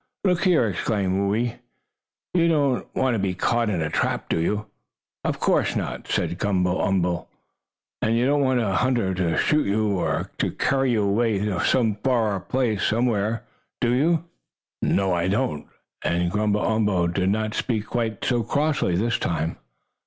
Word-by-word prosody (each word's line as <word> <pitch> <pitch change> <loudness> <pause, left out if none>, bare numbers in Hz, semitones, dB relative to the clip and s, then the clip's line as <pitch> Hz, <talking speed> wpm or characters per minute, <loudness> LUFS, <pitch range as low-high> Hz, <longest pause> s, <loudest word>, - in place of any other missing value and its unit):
"Look 180 -1 +2
here!" 170 -9 +4
exclaimed 100 -1 -1 0.2
Whoo 100 - +1
ee, 120 +1 -1 0.8
"you 170 -2 +3
don't 145 -6 +1
want 130 -1 +2
to 110 - 0
be 95 -2 -1
caught 115 +4 +1
in 90 -6 0
a 75 - -3
trap, - - -1
do - - +1
you?" 105 +6 -1 0.6
"Of - - -2
course - - +1
not," - - -4
said 90 - -1
Gumble 90 -3 +1
umble. 90 -4 0 0.7
"And 115 +1 +1
you 120 - +2
don't 145 +2 +2
want 130 -2 +2
a 100 -4 0
hunter 115 -1 +1
to 90 -3 0
shoot 150 -5 +2
you, 105 +2 +1
or - - -1
to - - 0
carry 135 -2 +1
you 110 -2 +2
away 105 +2 +1 0.7
far 115 -5 +2
off 110 +2 -1
somewhere, 115 -1 0 0.4
do 120 -1 +2
you?" 160 +6 +2 0.6
"You - - 0
know 95 -2 +2
I 85 0 0
don't," 75 -6 -1 0.4
and 85 0 0
Gumble 105 0 +1
umble 105 -5 +1
did 90 +2 0
not 110 +1 0
speak 110 -4 -1
quite 115 -2 -2
so 120 -2 +1
crossly 145 - 0
this 115 +6 0
time. 80 -1 -2
110 Hz, 165 wpm, -24 LUFS, 95-125 Hz, 0.8 s, here